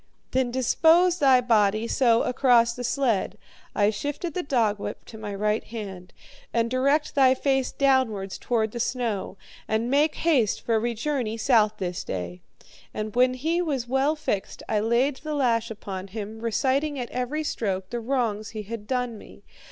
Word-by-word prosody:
"'Then 260 -1 +1
dispose 325 +8 +3
thy 265 -3 +6
body, 220 -2 +2
so, 235 -2 +3
across 240 -2 +3
the 245 - -6
sled,' 240 -4 0 0.4
I 205 0 +3
shifted 290 - -4
the 365 - -1
dogwhip 225 -9 -1
to 220 - -11
my 205 -2 -5
right 210 +2 0
hand. 195 -5 -8 0.4
'And 230 0 0
direct 275 +4 +1
thy 265 -2 +5
face 270 -1 0
downwards, 255 -8 +1
toward 220 -3 0
the 235 - -6
snow. 230 -5 -2 0.3
And 225 +3 0
make 295 +2 +3
haste, 270 -11 +1
for 225 -2 +1
we 235 +1 -2
journey 235 -3 -2
south 220 -3 +3
this 180 -1 -3
day.' 90 -1 -5 0.5
And 215 0 -4
when 255 +1 +4
he 325 +7 0
was 275 -8 -2
well 270 +4 +1
fixed 210 -10 -3
I 215 - +1
laid 240 +6 +1
the 305 +1 -5
lash 230 -4 +1
upon 195 -3 -6
him, 215 +2 -7
reciting, 265 +6 0
at 245 -2 -5
every 255 +5 -2
stroke, 190 -9 -3
the 240 - -2
wrongs 230 -4 -1
he 215 -2 -6
had 210 0 -7
done 250 -4 -2
me. - - -15
235 Hz, 165 wpm, -25 LUFS, 215-265 Hz, 0.5 s, thy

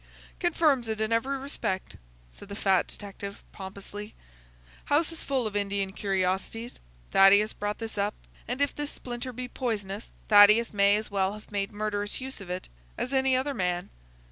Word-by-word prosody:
"Confirms 310 -8 +2
it 220 -1 -2
in 220 +1 +1
every 265 +5 +1
respect," 265 -8 -3 0.3
said - - -14
the 200 - -5
fat 195 -3 +2
detective, 200 -1 -8
pompously. 200 +2 -8 0.7
"House 310 +3 +2
is 330 - -6
full 265 -4 0
of 210 -1 -3
Indian 200 -1 0
curiosities. 195 +4 -1 0.3
Thaddeus 200 +2 +6
brought 205 0 -3
this 225 -2 -5
up, 205 +1 0 0.3
and 250 +4 -2
if 285 - +1
this 295 -1 -3
splinter 245 -1 -5
be 250 +1 -5
poisonous 215 -5 -3 0.2
Thaddeus 210 +2 +7
may 200 0 +5
as 215 0 -3
well 195 0 +1
have 215 0 -12
made 200 -1 -1
murderous 205 -1 -2
use 265 -4 -5
of 190 - -9
it 180 +1 -4 0.3
as 255 - -3
any 265 -1 +3
other 270 +2 0
man. 180 -6 -1
210 Hz, 170 wpm, -28 LUFS, 200-250 Hz, 0.7 s, Thaddeus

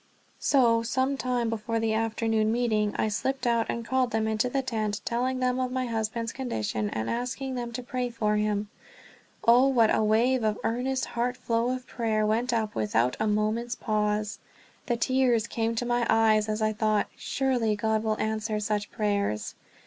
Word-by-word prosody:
So, 235 -5 +3
some 260 +4 0
time 250 -3 -1
before 225 +1 -2
the 225 -1 0
afternoon 220 0 +1
meeting 220 -3 +1
I - - +1
slipped 265 +5 -2
out 235 -1 +2
and 235 0 -3
called 260 0 +1
them 220 -1 0
into 220 +3 0
the 270 +1 -1
tent, 215 -4 -2
telling 255 +2 -1
them 255 0 +1
of 255 -1 -1
my 255 0 -1
husband's 230 0 -2
condition 110 - -2
and 110 +1 -3
asking 250 +3 -3
them 240 -2 -4
to 250 +2 -5
pray 250 0 -2
for 215 -3 0
him. 210 -1 -1 0.8
Oh, 245 +3 +7
what 235 -5 +4
a - - +2
wave 235 +4 +3
of 215 -1 +1
earnest, 255 +3 -1
heart 245 +1 -2
overflow 235 -1 0
of 255 0 -8
prayer 220 -3 0
went 230 +4 +1
up 220 -3 -1
without 115 +3 +1
a 215 - +1
moment's 215 +3 0
pause! 210 -1 -1 0.5
The 240 - +1
tears 245 -2 +2
came 230 0 -1
to 245 - -1
my 240 -1 +1
eyes 215 -1 +4
as 215 0 -1
I 215 0 +1
thought, 215 -1 +1
"Surely 250 -5 0
God 220 +1 0
will 220 -1 -1
answer 220 0 -1
such 210 -1 -2
prayers!" 200 - -1
225 Hz, 180 wpm, -27 LUFS, 215-245 Hz, 0.8 s, Oh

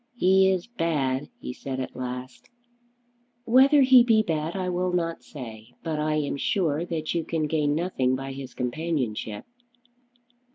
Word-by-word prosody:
"He 190 -3 +4
is 185 -2 0
bad," 145 - -1
he 125 - -6
said 130 0 -5
at 130 - -5
last. 125 0 -6 1.0
"Whether 270 +4 +6
he 255 -1 +8
be 225 -2 +4
bad 160 -2 -2
I 185 -1 -2
will 180 0 0
not 165 -2 -1
say; 115 -4 -10
but 160 -2 -2
I 155 0 0
am 145 -2 -1
sure 160 -1 0
that 160 -2 -3
you 170 -1 0
can 160 -1 -1
gain 150 -1 +1
nothing 140 -7 0
by 135 +1 -5
his 135 -2 -8
companionship." 125 -6 -3
155 Hz, 155 wpm, -26 LUFS, 130-180 Hz, 1.0 s, he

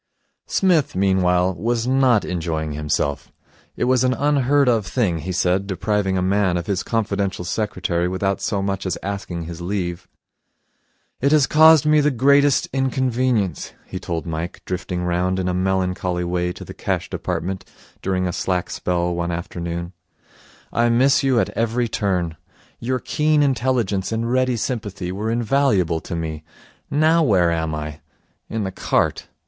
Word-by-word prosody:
Psmith, 175 -7 +2
meanwhile, 95 -1 +2
was 115 +4 -1
not 130 -4 +3
enjoying 80 -3 -2
himself. 75 -1 -2 0.5
It - - -1
was 130 0 +3
an 130 0 +2
unheard 145 -1 +2
of 115 -5 +2
thing, 95 -10 0
he 90 +5 -4
said, 90 +2 +1
depriving 95 0 0
a 90 - 0
man 95 -1 +2
of 85 - -3
his 100 -2 -1
confidential 100 -5 -1
secretary 90 -3 -1
without 95 +2 -1
so 100 0 -1
much 95 -1 -2
as 90 - -1
asking 95 -4 -4
his 85 +1 -7
leave. 90 -1 -3 1.1
'It 140 +2 +2
has 150 -3 +5
caused 155 0 +6
me 150 0 +5
the 150 - +3
greatest 140 +2 +3
inconvenience,' 130 - 0
he 95 - -6
told 85 -4 -4
Mike, 80 +1 -5
drifting 90 -1 -3
round 90 +1 0
in 95 -1 -1
a 90 - 0
melancholy 90 -1 0
way 90 0 -1
to - - -9
the - - -9
Cash - - -2
Department 95 +2 -3 0.4
during 95 -1 0
a 90 - -3
slack 90 -2 -1
spell 90 -1 -1
one 85 0 -2
afternoon. 85 0 -4 0.8
'I 120 0 +3
miss 130 +4 +4
you 135 -4 +2
at - - +1
every 115 +1 0
turn. 90 -7 -1 0.4
Your 130 +2 -1
keen 150 +3 +1
intelligence 120 -8 0
and 115 +1 -1
ready 130 -1 +2
sympathy 105 -6 -3
were 105 +4 -3
invaluable 115 - +1
to - - -6
me. 80 -2 -4 0.5
Now 155 +3 +3
where 95 - +3
am 80 -1 -1
I? 75 0 -6 0.5
In 110 -1 -2
the 95 - -3
cart. - - 0
95 Hz, 155 wpm, -21 LUFS, 90-125 Hz, 1.1 s, caused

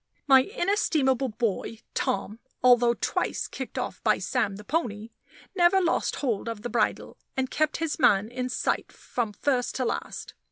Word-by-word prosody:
My 270 -2 +7
inestimable 305 - +1
boy, 225 0 -2 0.2
Tom, 205 +3 -2 0.2
although 245 -1 +5
twice - - -1
kicked - - -7
off - - -4
by - - +3
Sam 220 -6 -1
the 210 - -10
pony, 225 -6 -2 0.4
never 355 +1 +5
lost 345 -2 +1
hold 230 -5 -2
of 225 -2 -6
the 240 - -3
bridle, - - -1 0.2
and 260 -1 -1
kept 310 0 +1
his 325 -1 -2
man 205 -6 +4
in 250 +2 -4
sight - - -1
from 235 -4 -3
first 250 +3 -1
to 255 - -1
last. - - -4
250 Hz, 160 wpm, -27 LUFS, 225-295 Hz, 0.4 s, My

